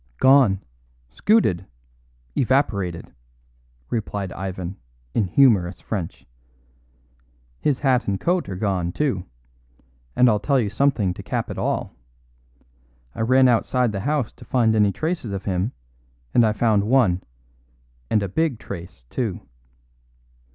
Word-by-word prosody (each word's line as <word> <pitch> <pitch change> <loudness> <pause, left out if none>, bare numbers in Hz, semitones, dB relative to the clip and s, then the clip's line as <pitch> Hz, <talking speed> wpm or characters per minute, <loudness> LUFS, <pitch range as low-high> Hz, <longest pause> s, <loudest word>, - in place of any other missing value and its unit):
"Gone. 130 -8 +5 0.5
Scooted. 95 - +2 0.7
Evaporated," 100 - 0 0.8
replied 100 -4 -3
Ivan 95 0 -5 0.4
in 110 - +2
humorous 95 -5 +3
French. 95 -7 -5 1.3
"His 145 -4 +1
hat 130 -3 +1
and 100 -1 0
coat 175 0 0
are 95 - -4
gone, 90 -3 -1
too, 125 -12 -1 0.9
and 125 - +5
I'll 105 -3 +3
tell 130 +7 +2
you 105 -4 -1
something 105 -5 +1
to - - -9
cap - - -3
it - - -5
all. - - -2 1.2
I - - -5
ran 130 +3 +5
outside 125 0 +2
the 100 - -3
house 140 +2 -1
to - - -14
find 115 -3 +2
any 105 -2 +4
traces 155 - -3
of 100 - -5
him, 95 +4 -1 0.6
and 120 - +5
I - - +2
found 105 -2 +2
one, 110 -7 +3 0.9
and 105 - +2
a - - -1
big 150 - 0
trace, 85 - -9
too." 110 -8 -2
110 Hz, 130 wpm, -23 LUFS, 95-130 Hz, 1.3 s, Gone